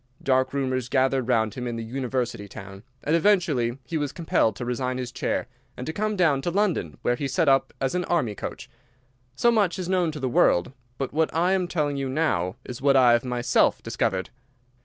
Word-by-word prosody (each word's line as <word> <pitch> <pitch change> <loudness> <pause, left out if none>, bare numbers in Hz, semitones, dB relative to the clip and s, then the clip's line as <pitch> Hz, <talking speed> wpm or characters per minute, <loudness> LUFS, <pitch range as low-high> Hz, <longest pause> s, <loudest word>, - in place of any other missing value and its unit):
Dark 130 -1 +2
rumours 130 -3 -1
gathered 130 -1 +1
round 110 -4 +2
him 125 -1 -5
in 120 - -3
the 115 - -4
university 120 -3 -3
town, 95 0 -10 0.2
and 155 - +2
eventually 160 - +2
he 160 +4 -2
was 145 -2 -2
compelled 155 - +1
to 120 - -5
resign 125 +1 -2
his 125 -1 -4
chair - - -2 0.3
and 125 - -5
to 160 - -4
come 215 +2 -1
down 160 -8 +3
to 155 - -1
London, 175 - 0
where 120 - +2
he 140 +3 -3
set 155 +4 +1
up 135 -1 +3
as 135 -1 -1
an 180 -1 -1
Army 140 -11 0
coach. - - -7 0.7
So 235 - +3
much 205 -5 +2
is 185 -2 -4
known 180 -3 +1
to 150 - -6
the 135 - -1
world, 90 -5 +3 0.3
but 135 -1 -3
what 160 +1 +1
I 175 +3 +2
am 185 -2 +1
telling 150 -5 -1
you 135 -1 -2
now 115 - 0
is 125 -1 -7
what 140 0 +4
I 125 -2 +6
have 120 0 +3
myself 125 -1 +1
discovered. 95 -1 -1
135 Hz, 210 wpm, -25 LUFS, 120-165 Hz, 0.7 s, I